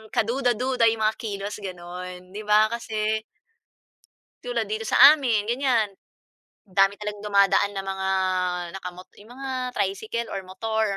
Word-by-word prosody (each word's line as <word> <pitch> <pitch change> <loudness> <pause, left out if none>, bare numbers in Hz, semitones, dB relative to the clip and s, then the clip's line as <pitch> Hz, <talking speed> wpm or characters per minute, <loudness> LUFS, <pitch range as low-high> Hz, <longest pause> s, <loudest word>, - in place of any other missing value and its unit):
kaduda-duda 245 +1 +1
yung 220 -1 -2
mga 215 - +1
kilos 205 -1 -4
ganun, 180 0 -8
‘di 210 - -5
ba 215 +1 +5
kasi 220 -2 -2 1.2
tulad 240 -2 -2
dito 215 +1 -2
sa - - +1 0.2
amin 235 -8 0
ganiyan, 240 -4 +1 0.7
dami 195 0 +2
talagang 210 0 -6
dumadaan 200 0 +3
na 195 - -3
mga 190 0 -3 0.7
naka 180 - -6
mot 185 +1 -13
'yong 215 +4 -14
mga 270 0 -6 0.2
tricycle, 220 +4 -2
or 195 - -3
motor, 220 +1 -1
215 Hz, 135 wpm, -25 LUFS, 195-230 Hz, 1.2 s, ba